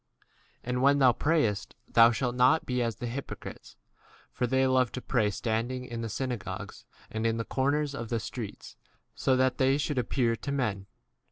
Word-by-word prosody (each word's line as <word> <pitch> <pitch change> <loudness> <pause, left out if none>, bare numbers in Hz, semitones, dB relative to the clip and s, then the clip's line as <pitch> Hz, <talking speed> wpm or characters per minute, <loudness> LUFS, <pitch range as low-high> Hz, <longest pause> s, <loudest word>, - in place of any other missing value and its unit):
d - - -39 0.4
5 - - -8
And 125 0 0
when 140 +1 +5
thou 130 -3 +6
prayest, 120 - 0
thou 115 0 +7
e - - -1
shalt 125 +1 -1
not 130 +6 +4
be 125 -1 -1
as 115 -2 -1
the 120 - -6
hypocrites; 125 +4 -7 0.5
for 125 - -1
they 130 +2 +2
love 130 -2 +3
to - - -3
pray 105 -4 +1
standing 115 +4 -2
in 120 -2 -5
the 115 - -3
synagogues 125 0 -5 0.3
and 110 0 -3
in 115 0 0
the 115 - -3
corners 145 +2 0
of 115 -5 -5
the 115 - 0
streets, 100 - -7 0.4
so 130 - +1
that 130 0 +1
they 135 +1 +4
should 145 -2 -1
appear 120 -1 +1
to 140 - -5
men. 110 -8 -1
125 Hz, 195 wpm, -29 LUFS, 115-130 Hz, 0.5 s, thou